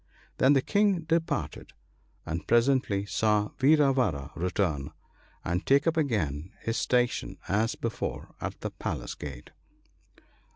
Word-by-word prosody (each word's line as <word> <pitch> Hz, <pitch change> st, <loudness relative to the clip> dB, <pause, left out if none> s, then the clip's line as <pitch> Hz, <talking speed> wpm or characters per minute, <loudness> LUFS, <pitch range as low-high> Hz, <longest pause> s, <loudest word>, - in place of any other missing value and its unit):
Then 130 Hz, +2 st, +6 dB
the 135 Hz, -2 st, +3 dB
King 200 Hz, -4 st, +2 dB
departed, 165 Hz, 0 st, -2 dB, 0.5 s
and 80 Hz, -1 st, -4 dB
presently 120 Hz, -5 st, +2 dB
saw 105 Hz, 0 st, +1 dB
Vira 140 Hz, 0 st, +5 dB
vara 75 Hz, -, -1 dB
return, 85 Hz, -5 st, -1 dB, 0.5 s
and 85 Hz, +3 st, -1 dB
take 140 Hz, +2 st, +3 dB
up 165 Hz, 0 st, +2 dB
again 95 Hz, -, -1 dB
his 115 Hz, +1 st, -2 dB
station 125 Hz, -1 st, 0 dB
as 110 Hz, +3 st, +1 dB
before 115 Hz, -1 st, -4 dB
at -, -, -5 dB
the -, -, -3 dB
palace -, -, -4 dB
gate. 70 Hz, -4 st, -9 dB
115 Hz, 125 wpm, -28 LUFS, 85-140 Hz, 0.5 s, Then